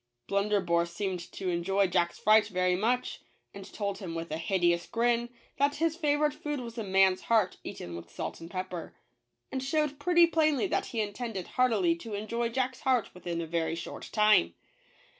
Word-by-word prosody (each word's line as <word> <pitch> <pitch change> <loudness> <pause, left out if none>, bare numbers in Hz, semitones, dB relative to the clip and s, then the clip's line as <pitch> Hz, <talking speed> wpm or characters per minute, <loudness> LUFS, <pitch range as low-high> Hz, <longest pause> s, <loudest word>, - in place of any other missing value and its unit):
Blunderbore 195 - +1
seemed 185 +1 -3
to 190 - -3
enjoy 190 +3 +1
Jack's 175 -1 0
fright 215 0 +5
very 185 -2 +1
much; 240 +6 -1 0.3
and 195 -1 -10
told 200 -2 -3
him 175 -4 -6
with 165 -1 -5
a 155 - -1
hideous 175 -1 +1
grin 235 0 +1 0.3
that 285 +1 +2
his 325 +1 0
favorite 300 -2 +1
food 295 -2 -4
was 235 -2 -7
a - - -2
man's 190 -1 +3
heart 215 -5 +2
eaten 85 -1 -7
with 85 0 -9
salt - - -6
and 165 - -8
pepper; 185 -2 -5 0.6
and 265 -1 -3
showed 295 0 0
pretty 345 +2 +5
plainly 310 -2 +2
that 375 - -1
he 230 - -2
intended 205 -2 -4
heartily 255 +8 +2
to 230 -11 -7
enjoy 230 +3 -2
Jack's 255 +1 -1
heart 255 -7 +1
within 175 -2 -4
a - - -3
very 165 0 -1
short 165 - -7
time. 210 - +4
205 Hz, 180 wpm, -29 LUFS, 180-255 Hz, 0.6 s, fright